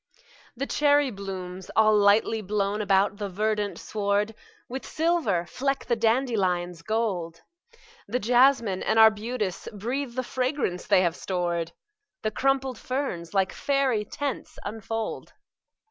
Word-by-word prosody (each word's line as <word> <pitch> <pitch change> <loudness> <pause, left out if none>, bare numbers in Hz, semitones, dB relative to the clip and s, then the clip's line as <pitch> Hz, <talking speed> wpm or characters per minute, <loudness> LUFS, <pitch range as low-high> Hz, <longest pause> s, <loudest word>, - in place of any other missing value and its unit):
The 275 - -1
cherry 290 -2 +3
blooms, 190 -2 -7
all 215 -1 +5
lightly 210 +2 +4
blown 205 +1 -1
about 200 0 +2
the 205 -1 -4
verdant 210 +1 -1
sward, 205 +1 -1 0.3
With 260 +2 -5
silver 315 - 0
fleck 275 +9 -2
the 240 - +1
dandelion's 205 -8 0
gold; 180 -5 -2 0.7
The 230 +5 0
jasmine 245 -4 +3
and 220 - +1
arbutus 220 -2 +3
breathe 240 +5 -3
the 255 - -1
fragrance 255 -8 -2
they 185 - +5
have 170 -2 +1
stored; 175 -3 -2 0.5
The 215 - 0
crumpled 265 +1 0
ferns, 230 - -3
like 190 -1 +2
faery 275 -6 +1
tents, 275 +5 -5
unfold. 225 +1 -4
215 Hz, 125 wpm, -26 LUFS, 195-255 Hz, 0.7 s, all